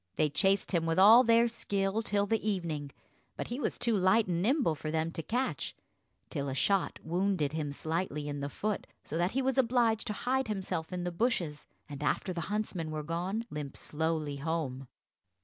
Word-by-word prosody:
They 150 -2 +2
chased 195 +5 +2
him 165 -3 +1
with 165 - +1
all 220 +6 +9
their 230 0 +5
skill 200 -2 -1
till 205 -2 +1
the 220 +1 0
evening; 165 -7 -2 0.5
but - - -4
he 240 +3 -3
was - - -1
too 235 -2 +1
light 195 +3 +4
and 175 -1 0
nimble 250 - +2
for 155 0 -5
them 160 +1 0
to 165 - -3
catch, 250 +9 -2 0.6
till 140 -3 -2
a 130 - -3
shot 195 +7 +1
wounded 175 -3 0
him 155 -2 -2
slightly 155 0 -3
in 145 -1 -3
the 140 0 -3
foot, 210 +7 -3 0.2
so - - -6
that 175 +2 +1
he 270 +1 +1
was 265 +1 +1
obliged 235 -3 +2
to 210 - -1
hide 260 +4 0
himself 190 -6 -3
in 180 -1 -3
the 175 - -2
bushes, 170 -7 -1 0.2
and, 145 -1 -8
after 185 +5 0
the 170 - -3
huntsmen 205 -6 -2
were 155 -1 -3
gone, 180 +8 -2
limp 145 -2 -5
slowly 155 -2 -2
home. 140 -4 -3
180 Hz, 195 wpm, -31 LUFS, 155-215 Hz, 0.6 s, all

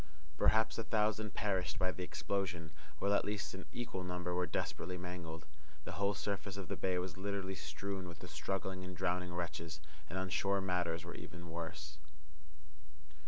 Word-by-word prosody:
Perhaps 110 +6 +5
a - - +2
thousand 110 -1 +2
perished 95 -2 +2
by 95 -1 +3
the 95 - -5
explosion, 90 -3 0 0.3
while 100 +5 +3
at - - +5
least 105 -1 -1
an 95 0 -6
equal 115 -6 -2
number 90 -1 -1
were 90 0 +3
desperately 90 +3 -1
mangled. 85 -2 -4 0.4
The - - -2
whole 100 0 +2
surface 100 0 -1
of 100 -3 -4
the - - +1
bay 95 -1 +2
was 90 0 -1
literally 100 -1 0
strewn 95 0 -3
with 85 -2 -6
the - - -7
struggling 95 -1 -1
and 90 -1 -5
drowning 90 +2 +2
wretches, 85 -2 -2 0.3
and 95 - -2
on 95 0 +1
shore 100 +2 +4
matters 90 -3 +1
were 85 - -4
even 85 0 -7
worse. 80 -2 -4
90 Hz, 170 wpm, -38 LUFS, 85-100 Hz, 0.4 s, Perhaps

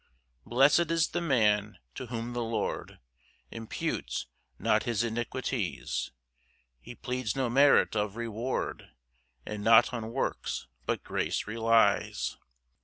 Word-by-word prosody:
2 - - -17
Blest 135 +7 +5
is 165 -1 +2
the 175 - -2
man 105 -9 +2 0.2
to 130 - -7
whom 115 0 -4
the 120 - -2
Lord 115 0 -3 0.5
Imputes 115 -1 -3 0.3
not - - +2
his 115 -2 0
iniquities, 120 - -2 0.7
He 120 - -11
pleads 125 -3 -3
no 130 -3 0
merit 140 -2 +5
of 105 -1 -1
reward, 115 +2 -3 0.6
And 105 -1 -5
not 115 +3 +6
on 115 -2 -4
works, 130 - -2 0.2
but - - -1
grace - - -2
relies. 115 +1 +2
115 Hz, 120 wpm, -29 LUFS, 110-130 Hz, 0.7 s, not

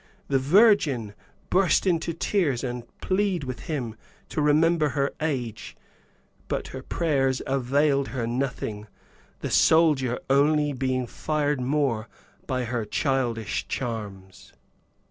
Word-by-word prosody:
The 135 -1 +3
virgin 145 - +4 0.4
burst 185 -2 +3
into 170 -2 +1
tears 165 - 0
and 125 -2 -4
plead 190 -3 0
with 130 -2 -6
him 125 -8 -3 0.3
to 155 - -2
remember 155 +1 +3
her 140 0 -1
age, 125 -8 -3 0.7
but - - -3
her - - -7
prayers 135 -6 0
availed 140 +1 +1
her 125 -4 -3
nothing, 120 -4 -3 0.5
the - - -3
soldier 150 -7 +4
only 145 +2 +3
being 130 -1 -1
fired 150 +2 -1
the 125 - -2
more 130 -6 0 0.4
by 130 -1 -1
her 120 -1 -2
childish 120 -1 -1
charms. 100 -6 -6
135 Hz, 120 wpm, -25 LUFS, 120-155 Hz, 0.7 s, virgin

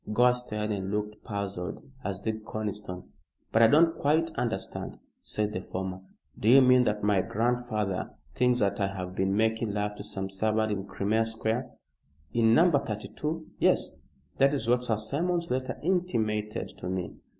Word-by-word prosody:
Gore 125 +3 +5
stared 110 -4 -3
and 95 -2 -2
looked 105 +1 -3
puzzled, 100 -4 -4 0.2
as 100 -1 -3
did 110 +1 -3
Conniston. 105 -4 -5 0.5
"But 110 - +4
I 115 - +9
don't 165 +6 +4
quite 160 +3 +2
understand," 115 -10 -3 0.2
said 105 0 -2
the 95 - -3
former. 95 -1 -5 0.4
"Do 110 - +2
you 135 +3 +9
mean 125 0 +6
that 105 -2 0
my 100 -2 +3
grandfather 110 -3 -1 0.2
thinks 125 0 +3
that 100 -1 +1
I 100 - +2
have 90 -2 -5
been 95 +1 +1
making 110 -1 +1
love 105 0 -1
to - - -6
some 95 -1 -4
servant 110 +2 +1
in 100 -1 -3
Crimea 110 +3 +1
Square?" 115 +3 -1 0.6
"In 115 -1 +4
No. 175 +5 +6
32. 150 +5 -2
Yes. - - +2 0.4
That 140 +2 +4
is 115 -5 -2
what 125 +1 +3
Sir 115 -3 0
Simon's 170 +10 -1
letter 130 +1 -2
intimated 110 - 0
to 90 - -4
me." 90 -2 -3
110 Hz, 165 wpm, -28 LUFS, 100-125 Hz, 0.6 s, I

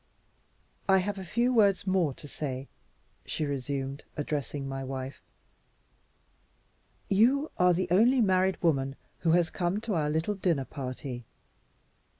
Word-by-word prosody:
"I 190 - +7
have 195 +1 -1
a - - -5
few 235 +7 +1
words 200 -6 +4
more 185 -6 +2
to 170 -3 -9
say," 135 -2 -5 0.6
she 155 - -2
resumed, 140 0 -3
addressing 145 -2 -3
my 135 0 -4
wife. 130 0 -5 1.9
"You 255 +9 +3
are 180 0 +6
the 185 +2 0
only 235 +8 +5
married 190 -3 +3
woman 135 -5 +2 0.2
who 165 -1 +2
has 175 -1 +3
come 175 +3 -1
to 225 -2 -2
our 155 -4 +1
little 160 +7 0
dinner 170 -8 0
party. 130 -3 -6
165 Hz, 135 wpm, -29 LUFS, 135-190 Hz, 1.9 s, I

